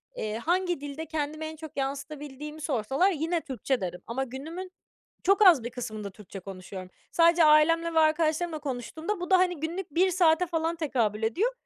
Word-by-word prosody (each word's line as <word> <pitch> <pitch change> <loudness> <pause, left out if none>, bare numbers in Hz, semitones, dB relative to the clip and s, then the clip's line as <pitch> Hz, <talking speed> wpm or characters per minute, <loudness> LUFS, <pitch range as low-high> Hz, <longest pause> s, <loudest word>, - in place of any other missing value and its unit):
eee, 215 - -3
hangi 350 +5 0
dilde 290 +3 -6
kendimi 310 0 -3
en 315 0 -6
çok 315 -2 -10
yansıtabildiğimi 290 +2 -5
sorsalar 275 - +1
yine 330 +1 -1
Türkçe 265 -4 -2
derim. 180 -1 -4
Ama 255 +4 -2
günümün 320 +9 -7 0.5
çok 395 +3 +4
az 320 -10 +7
bir 240 - -3
kısmında 215 -5 -6
Türkçe 195 0 -10
konuşuyorum. 185 0 -9 0.2
Sadece 335 0 +5
ailemle 330 +2 +4
ve - - +4
arkadaşlarımla 315 +1 +2
konuştuğumda 305 - -4
bu 355 +1 -5
da, 375 - +7
hani, 360 -4 +1
günlük 340 +3 -4
1 370 +2 +4
saate 350 -1 +3
falan 330 0 -1
tekabül 235 -9 0
ediyor. 370 - +1
310 Hz, 170 wpm, -28 LUFS, 260-335 Hz, 0.5 s, az